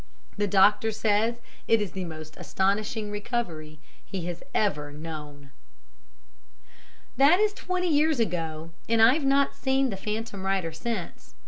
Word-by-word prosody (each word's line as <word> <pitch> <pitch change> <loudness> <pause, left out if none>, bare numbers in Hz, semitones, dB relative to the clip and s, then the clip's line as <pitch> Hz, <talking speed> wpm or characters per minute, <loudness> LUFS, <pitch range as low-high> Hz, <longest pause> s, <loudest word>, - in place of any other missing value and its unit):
The 205 0 0
doctor 205 +3 +4
says 220 +1 +1 0.3
it 225 - +4
is 205 -3 -3
the 190 -1 -4
most 155 -2 -8
astonishing 210 +3 -1
recovery 200 -8 -4 0.3
he 185 -4 -5
has 175 -1 -5
ever 150 -9 0
known.' 150 -2 -8 1.7
"That 285 +7 +6
is 425 -1 +2
twenty 360 -4 -1
years 300 -1 +3
ago, 165 -5 -2 0.2
and 230 0 +3
I've 255 +7 +5
not 275 +1 +3
seen 265 -1 +1
the 195 - -4
phantom 210 -1 -4
rider 190 -3 0
since. 185 +3 -5
205 Hz, 135 wpm, -27 LUFS, 165-235 Hz, 1.7 s, That